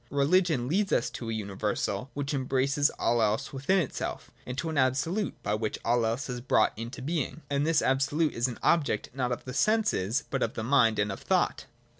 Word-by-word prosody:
Religion 145 -2 +2
leads 190 +6 +1
us - - +1
to 115 - -6
a - - -1
universal, 105 +2 -2
which 145 0 -2
embraces 135 +2 +1
all 120 0 +2
else 110 +3 0
within 140 +8 +1
itself, 170 -8 -3 0.2
to 165 - -3
an 160 - -3
Absolute 140 +10 +1
by 105 - -1
which 105 0 -2
all 120 -1 +2
else 120 +6 -2
is 125 -2 -4
brought 115 -3 +3
into 115 +4 -7
being: 155 -1 -3
and 140 +2 +1
this 165 -1 +3
Absolute 140 +4 +1
is 120 +2 0
an 125 - -6
object 150 -10 +1
not 125 -2 -1
of 120 - -4
the 125 - -6
senses 150 - +1
but 135 - -1
of 115 - -1
the 110 - -3
mind 120 -3 +3
and 105 0 +1
of 95 - -6
thought. - - 0
130 Hz, 200 wpm, -28 LUFS, 115-150 Hz, 0.2 s, brought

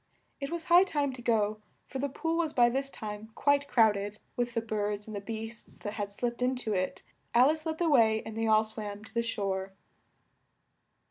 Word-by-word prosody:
It 275 0 -3
was 335 0 -3
high 350 +2 +7
time 290 -7 -1
to 255 - -9
go, 215 -2 +1 0.2
for 265 - -6
the 280 +1 -1
pool 325 +4 -2
was 330 -3 0
by 240 -1 +6
this 270 +3 -1
time 215 -2 -7
quite 285 0 +2
crowded 210 -4 +3 0.2
with 240 -1 -1
the 230 - +2
birds 210 -1 -2
and 205 -2 -5
beasts 225 +2 -6
that 205 - -5
had 205 -2 -3
slipped 240 +3 -3
in 255 +1 +2
to 225 -4 -2
it. 185 -1 -2 0.3
Al 255 +5 +7
ice 315 +1 -4
led 315 0 -2
the 345 - +1
way 225 -7 +4
and 220 - -7
they 225 0 0
all 215 0 +5
swam 215 -1 -6
to 220 - -14
the 235 - +2
shore. 195 -4 -2
225 Hz, 205 wpm, -30 LUFS, 210-275 Hz, 0.3 s, high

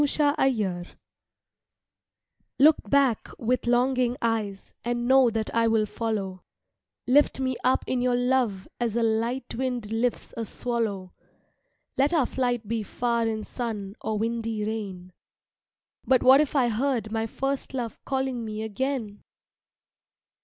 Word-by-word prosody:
THE 295 - +4
FLIGHT 245 - 0 1.6
LOOK 285 -6 +4
back 270 -4 +2
with 245 +1 -1
longing 250 0 +2
eyes 215 -4 -2
and 240 0 -1
know 260 -1 +6
that 225 -1 -3
I 230 0 +3
will 225 -1 +3
follow, 205 -4 -3 0.6
Lift 280 +2 +4
me 260 -1 0
up 255 - +2
in 255 -1 -1
your 250 0 +2
love 245 -6 +1
as 235 -2 -1
a 235 - +2
light 230 +3 -1
wind 245 -4 -3
lifts 230 +2 -1
a 230 - -3
swallow, 215 -5 -3 0.9
Let 285 +5 +3
our 295 -6 +3
flight 245 -4 -1
be 225 +1 -1
far 235 +2 -1
in 220 -1 -2
sun 210 -5 -5
or 220 -1 -2
windy 225 -1 -2
rain 195 -5 -5 0.9
BUT 260 -2 +4
WHAT 265 +3 +8
IF 300 -1 -2
I 250 -4 +3
HEARD 230 -2 -1
MY 225 0 -1
FIRST 270 +3 -3
LOVE 240 -3 -4
CALLING 265 -3 -2
ME 215 0 -4
AGAIN? 220 -1 -3
235 Hz, 140 wpm, -26 LUFS, 220-260 Hz, 1.6 s, WHAT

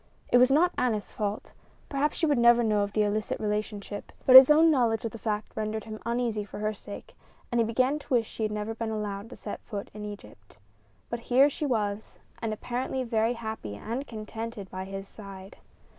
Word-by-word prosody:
It 245 - +6
was 250 +1 +6
not 335 +6 +4
Aneth's 220 -5 0
fault 210 0 -4 0.3
perhaps 285 +1 -1
she 330 - +1
would 290 -5 +2
never 235 0 +6
know 215 -2 +2
of 200 0 -2
the 215 - +3
illicit 210 0 -1
relationship; 210 -1 -4
but 260 - +7
his 260 +1 +12
own 320 +2 +6
knowledge 235 -6 +1
of 225 - -2
the 230 - -9
fact 215 -1 -3
rendered 215 0 -3
him 215 -1 -8
uneasy 235 -3 -1
for 205 - -10
her 215 +1 -1
sake, 205 0 -10 0.4
and 240 -1 +3
he - - +2
began 255 +6 +1
to - - -17
wish 230 -2 +2
she - - -8
had 215 -1 0
never 210 +1 -3
been 225 0 -4
allowed 210 -1 -4
to - - -9
set - - -7
foot 205 -3 -7
in 210 0 -8
Egypt. 105 - -10 0.5
But 235 - -2
here 270 +4 +6
she 295 - -3
was, 210 -4 -2 0.2
and 225 - -2
apparently 250 +4 -3
very 230 -1 +1
happy 220 - -6
and 235 - -5
contented 220 -2 -7
by 185 0 -5
his 195 0 -7
side. 195 -2 -11
220 Hz, 205 wpm, -28 LUFS, 210-245 Hz, 0.5 s, his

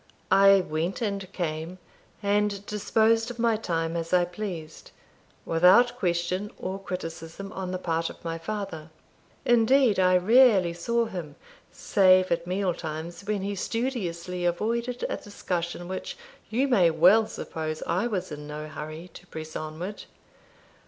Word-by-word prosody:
I 195 0 +7
went 165 +2 -2
and 200 -3 -3
came, 165 0 -4 0.5
and 205 0 +1
disposed 225 +2 +2
of 245 - -7
my 230 -1 +2
time 165 -6 -2
as 165 +1 -3
I 180 -1 +5
pleased, 175 -4 -7 0.6
without 185 +9 +5
question 180 -1 -1
or 190 +1 -4
criticism 180 +1 -6
on 190 -1 -5
the 185 - -2
part 165 -2 -1
of - - -13
my 165 0 -3
father. 195 -4 -5 0.6
Indeed, 240 -2 +4
I 185 0 +5
rarely 205 -3 +5
saw 235 +7 0
him, 175 -9 -7 0.4
save 185 -1 +4
at 170 0 0
meal 185 0 0
times, 160 +2 -6
when 205 -2 -1
he 200 +1 -2
studiously 185 -6 -3
avoided 235 +8 -1
a - - -3
discussion 175 -3 -4
which 185 - -5 0.3
you 255 +5 +1
may 190 -10 +4
well 185 +8 +5
suppose 155 -6 -5
I 185 +7 0
was 195 -8 -3
in 150 0 -7
no 150 +1 -6
hurry 155 +3 -7
to - - -13
press 155 0 -8
onward. 160 +6 -6
185 Hz, 145 wpm, -27 LUFS, 165-210 Hz, 0.6 s, I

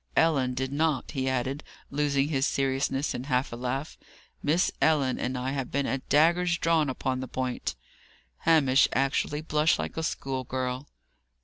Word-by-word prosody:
"Ellen 135 -6 +3
did 130 +1 -2
not," 150 -3 0
he 130 -3 -1
added, 130 +3 -2 0.3
losing 140 0 +1
his 135 -3 +1
seriousness 135 +1 0
in 125 - -5
a - - -12
half 125 -2 0
laugh. 125 +5 -4 0.4
"Miss 160 +5 +2
Ellen 145 -5 +2
and 130 +1 -2
I 130 +1 -2
have 135 -3 -3
been 140 0 0
at 135 -1 -3
daggers 170 +3 +4
drawn 165 -4 +2
upon 130 0 -2
the 130 - -4
point." 130 -1 -3 0.6
Hamish 140 -5 +4
actually 135 +2 0
blushed 155 0 +2
like - - -5
a - - 0
schoolgirl. 130 -2 -3
135 Hz, 155 wpm, -28 LUFS, 130-150 Hz, 0.6 s, daggers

